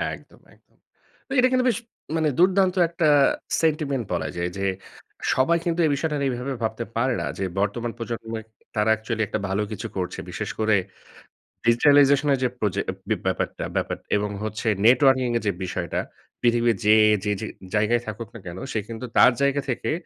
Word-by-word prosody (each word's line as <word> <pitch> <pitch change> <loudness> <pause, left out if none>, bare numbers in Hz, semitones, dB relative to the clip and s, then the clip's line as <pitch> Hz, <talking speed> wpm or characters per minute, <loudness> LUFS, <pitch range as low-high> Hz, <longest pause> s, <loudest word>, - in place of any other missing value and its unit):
একদম, - - -19
একদম। - - -30 0.5
তো - - -19
এটা 255 - +6
কিন্তু 255 0 +2
বেশ 225 - 0 0.4
মানে 155 -1 +2
দুর্দান্ত 185 0 +4
একটা 170 -2 0 0.5
সেন্টিমেন্ট 150 -5 0
বলা 80 -3 -1
যায়। 85 +1 -1
যে 100 - -2 0.7
সবাই 150 +6 +3
কিন্তু 170 0 0
এই 150 - +2
বিষয়টা 150 +1 -1
নিয়ে 135 -2 0
এভাবে 130 +2 -3
ভাবতে 110 +1 -2
পারে 130 +2 +2
না। - - -2
যে 95 - -1
বর্তমান 115 +4 -1
প্রজন্মে 115 -1 -5 0.3
তারা 105 0 +2
অ্যাকচুয়ালি 110 0 -2
একটা 110 - -2
ভালো 95 +2 0
কিছু 105 - -5
করছে। 90 -1 -3
বিশেষ - - -4
করে 110 -1 +3 0.9
ডিজিটালাইজেশন 140 +4 +5
এর 135 - 0
যে 125 - +2
প্রজে 105 -4 0 0.3
ব্যা - - +2
ব্যাপারটা - - -2
ব্যাপার - - -1 0.2
এবং 105 0 -1
হচ্ছে 110 +1 -4 0.2
নেটওয়ার্কিং 130 +1 +5
এর - - -5
যে 100 - +3
বিষয়টা। 90 -2 -2 0.4
পৃথিবীর 120 -2 +3
যে 105 +1 +7 0.3
যে 105 - 0
যে - - -3 0.3
জায়গায় 110 +3 +2
থাকুক 110 +1 -5
না - - -7
কেনো। 90 +2 -7
সে 110 - 0
কিন্তু 115 +2 -6
তার - - +8
জায়গা 140 0 +2
থেকে 125 - -1
120 Hz, 175 wpm, -24 LUFS, 110-140 Hz, 0.9 s, তার